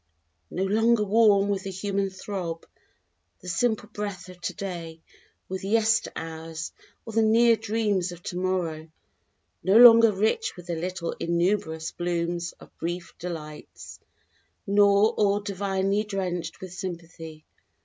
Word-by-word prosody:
_ - - -6
_No 190 +1 +1
longer 225 +2 +3
warm 205 -1 +4
with 200 -1 0
the 195 - -6
human 195 +1 -2
throb 185 -3 -5 0.8
the - - -12
simple 220 +3 0
breath 205 -4 -6
of 180 -1 -13
today, 170 -3 -5 0.5
With 190 0 -5
yester 225 +2 +2
hours 160 0 -6 0.3
or 225 - -8
the 225 - +3
near 230 +1 +5
dreams 210 -4 -1
of 175 0 -11
to - - -5
morrow. 170 -4 -2 0.7
No 195 +3 +5
longer 230 -2 +9
rich 220 - 0
with 180 - -11
the 175 -1 -3
little 175 +1 -3
innumerous 170 -2 0
blooms 175 0 -2
of - - -18
brief 175 +1 -4
delights, 155 -4 -8 0.7
Nor 200 +1 +4
all 205 -1 +2
divinely 200 0 -1
drenched 180 -5 -4
with 185 -1 -8
sympathy. 165 -4 -8
190 Hz, 135 wpm, -26 LUFS, 170-210 Hz, 0.8 s, longer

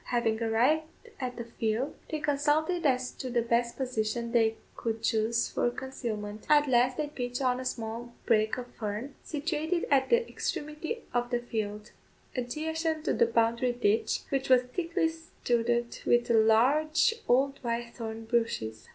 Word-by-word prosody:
Having 230 -2 0
arrived 250 +8 +2 0.3
at 250 -2 -3
the 235 - -3
field, 230 +3 -2 0.2
they 310 - -2
consulted 300 +4 +1
as 255 -1 +1
to 260 - -6
the 240 -1 +1
best 235 0 +1
position 235 -2 -2
they 225 -2 +3 0.2
could 225 -1 -3
chose 225 0 +2
for - - 0
concealment. 220 -5 -5
At 295 -1 +5
last 250 0 +3
they 305 - 0
pitched 245 -4 -4
on 255 -2 +1
a 260 - -5
small 230 0 -4
brake 215 -1 +2
of 250 - -4
fern, 225 +3 -5
situated 320 +2 -1
at 270 -2 +4
the 475 0 +3
extremity 305 +10 -4
of 245 0 0
the 245 - +1
field, 215 -3 -4 0.4
adjacent 315 +5 -2
to - - +2
the 470 - +3
boundary 235 - +2
ditch, 225 -2 +1
which 270 -1 -1
was 255 -1 +6
thickly 330 +5 -1
studded 240 -7 -1
with 240 0 +3
large, 260 - +4
old 275 +3 +3
white 235 0 -2
thorn 225 -1 -6
bushes. 225 - -1
245 Hz, 155 wpm, -29 LUFS, 230-290 Hz, 0.4 s, was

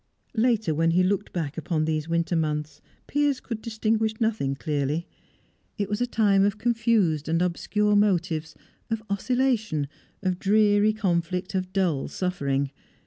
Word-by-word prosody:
Later, 225 -6 +2
when 165 +2 +2
he 180 +2 +3
looked 195 +1 0
back 160 -3 -3
upon 155 -1 -1
these 155 0 -1
winter 170 +1 0
months, 150 -1 -2 0.2
Piers 290 -2 +1
could 230 -3 -6
distinguish 220 -1 0
nothing 220 - 0
clearly. 150 +3 -1 0.7
It 200 -1 -2
was 210 +3 -2
a 245 - +2
time 205 -5 +3
of 205 +1 +1
confused 220 -9 +1
and 165 +1 +2
obscure 210 +4 +1
motives, 175 -6 +1 0.3
of 225 -1 -2
oscillation, 220 - 0 0.4
of 185 -1 0
dreary 205 +1 +4
conflict, 180 -2 -1
of 185 -1 -2
dull 175 -8 0
suffering. 140 -7 -1
190 Hz, 140 wpm, -26 LUFS, 160-220 Hz, 0.7 s, dreary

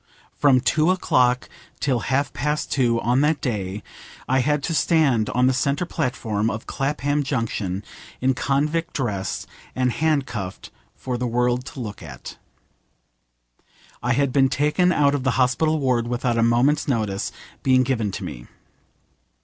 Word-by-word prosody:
From 135 -3 +4
two 155 +5 +2
o'clock 125 -9 +2 0.3
till 130 -4 +1
half 140 +2 +1
past 150 +1 -2
two 120 -4 +2
on 125 +3 +2
that 150 0 +2
day 105 -5 -3 0.4
I 130 +1 +2
had 150 +2 +1
to 165 - -1
stand 145 -10 +2
on 125 +1 +2
the 130 - +3
centre 140 +6 0
platform 115 -9 -1
of 110 0 -5
Clapham 145 +1 -1
Junction 110 -8 -2 0.4
in 130 +1 +2
convict 150 +5 -1
dress, 105 -8 -2 0.3
and 125 -1 +1
handcuffed, 135 -11 -2 0.2
for 125 -2 -4
the 125 - -1
world 125 +1 0
to 135 - -9
look 105 -4 -6
at. 70 -7 -9 1.6
I 125 +1 +1
had 140 0 +1
been 135 -2 +4
taken 150 +6 +2
out 145 -4 +3
of 145 - 0
the 130 -3 0
hospital 145 +5 +2
ward 125 -4 +1
without 120 0 -1
a 115 - +2
moment's 125 +7 +3
notice 110 -7 -1 0.3
being 130 -1 +4
given 120 -5 0
to - - -5
me. - - -7
130 Hz, 150 wpm, -23 LUFS, 120-145 Hz, 1.6 s, From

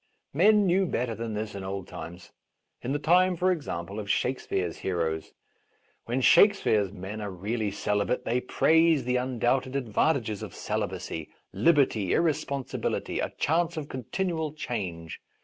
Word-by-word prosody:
Men 205 +7 +5
knew 190 +1 +3
better 120 -6 -1
than 115 -1 -4
this 105 0 -4
in 100 -1 -6
old 95 0 -5
times 90 +2 -9 0.2
— - - -52
in 125 - -2
the 145 - +1
time, 180 +5 +4
for 185 +2 +2
example, 100 - -4
of 100 -1 -6
Shakespeare's 95 -10 -1
heroes. 80 -4 -2 0.7
When 125 +3 -1
Shakespeare's 130 - +5
men 105 +2 -7
are 105 - -4
really 105 +4 -2
celibate 105 +2 -1
they 125 +2 +1
praise 160 +2 +3
the 125 +1 +1
undoubted 130 +1 0
advantages 120 -2 0
of - - -7
celibacy, 80 -2 -4 0.2
liberty, 115 - +3
irresponsi 140 -5 -1
bility, - - -1
a - - -3
chance 170 +2 +1
of 150 -2 -5
continual 160 - -2
change. 90 - -5
125 Hz, 150 wpm, -27 LUFS, 100-160 Hz, 0.7 s, Men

